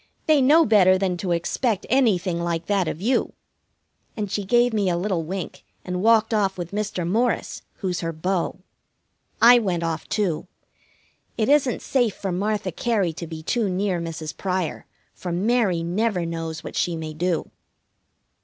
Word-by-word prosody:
"They 305 -3 +4
know 305 +5 +6
better 185 -4 +5
than 185 -1 0
to 180 0 -3
expect 200 +5 0
anything 190 -9 +2
like 170 -1 -2
that 195 -4 +1
of 155 - -3
you," 250 +4 +1 0.8
and 205 -3 -3
she 205 - -1
gave 240 +4 +3
me 205 -3 +1
a 170 - 0
little 185 -1 -1
wink 185 +3 -6 0.2
and 180 0 -3
walked 225 +1 +4
off 195 -3 +1
with 175 -1 -5
Mr. 205 -4 -2
Morris, 230 +6 0
who's 185 -3 -3
her 165 -1 -2
beau. 175 +3 -2 0.8
I 240 +1 +9
went 180 -6 -1
off, 165 -1 -3
too. 190 -7 -1 0.9
It 220 +2 +1
isn't 280 -4 +2
safe 245 -6 +1
for 195 - -4
Martha 200 +1 -1
Cary 200 -3 0
to 170 +1 -7
be 160 -1 -8
too 225 +3 0
near 185 -1 -1
Mrs. 160 -2 -5
Pryor, 185 -4 -3 0.3
for 180 - -6
Mary 195 -2 +1
never 180 +1 0
knows 165 -1 -5
what - - -8
she 175 -2 0
may 155 -1 -5
do. 170 +1 -1
185 Hz, 165 wpm, -23 LUFS, 170-215 Hz, 0.9 s, I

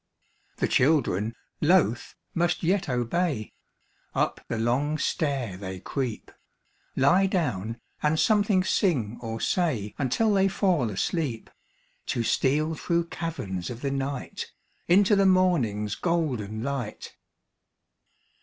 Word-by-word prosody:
The - - +1
children, 120 - +2 0.3
loath, 155 - +2 0.2
must 175 +1 0
yet 185 0 +1
obey; 125 0 -1 0.6
Up - - 0
the 115 - -2
long 130 +7 +1
stair 135 - -1
they 95 -1 -6
creep; 125 +2 -4 0.6
Lie 180 +9 +4
down, 115 - -1 0.2
and 155 +1 +2
something 205 -3 +3
sing 135 - 0
or 115 -1 -4
say 125 - 0
Until 175 - +2
they 195 -1 +4
fall 185 - +1
asleep, 115 - -2 0.6
To 120 - 0
steal 150 +7 +1
through 170 +1 -1
caverns 100 - -4
of 120 -1 -7
the 140 - -1
night 135 0 -3 0.4
Into 200 +4 +5
the 195 -1 +4
morning's 135 - +2
golden 125 - -1
light. 130 -5 -4
140 Hz, 115 wpm, -26 LUFS, 115-175 Hz, 0.6 s, Into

